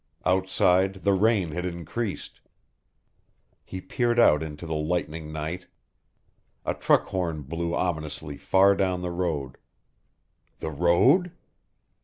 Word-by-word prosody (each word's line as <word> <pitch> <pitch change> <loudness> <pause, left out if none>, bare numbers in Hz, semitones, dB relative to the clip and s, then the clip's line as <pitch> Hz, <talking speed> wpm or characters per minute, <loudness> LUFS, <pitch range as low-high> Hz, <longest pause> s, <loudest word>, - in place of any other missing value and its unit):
Outside 95 0 +2
the 100 - +3
rain 100 -3 +2
had 90 +3 -3
increased. 90 +5 -5 1.2
He 95 - -7
peered 120 +5 -1
out 75 -10 +5
into 80 +1 -7
the 80 - -4
lightning 80 0 -2
night. 80 +4 -5 1.0
A - - 0
truck - - +2
horn 85 -6 -2
blew 85 +4 -3
ominously 75 -4 -3
far 95 +6 +4
down 90 -2 -1
the 90 - -3
road. 80 -7 -3 1.0
The 80 - -5
road? 125 - +3
90 Hz, 115 wpm, -26 LUFS, 80-95 Hz, 1.2 s, out